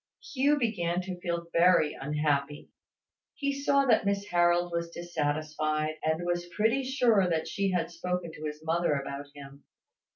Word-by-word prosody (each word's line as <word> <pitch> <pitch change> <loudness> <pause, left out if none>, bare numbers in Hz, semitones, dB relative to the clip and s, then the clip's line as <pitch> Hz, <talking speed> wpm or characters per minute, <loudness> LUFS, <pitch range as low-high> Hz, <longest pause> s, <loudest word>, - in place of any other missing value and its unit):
Hugh 285 +2 +3
began 180 -9 0
to 185 -1 -6
feel 170 -1 -2
very 170 -3 +4
unhappy. 145 0 -2 0.6
He 280 -2 -1
saw 280 0 +2
that 235 -4 +4
Miss 200 0 0
Harold 175 -1 +2
was 170 0 -2
dissatisfied, 155 -2 -2
and 160 +2 0
was 175 0 -2
pretty 225 +5 +2
sure 240 -8 +3
that 160 -2 -1
she 200 -1 -1
had 175 -2 -1
spoken 180 0 -3
to 155 0 -8
his 150 0 -6
mother 165 0 +1
about 140 +1 -5
him. 140 0 -12
175 Hz, 155 wpm, -29 LUFS, 155-200 Hz, 0.6 s, very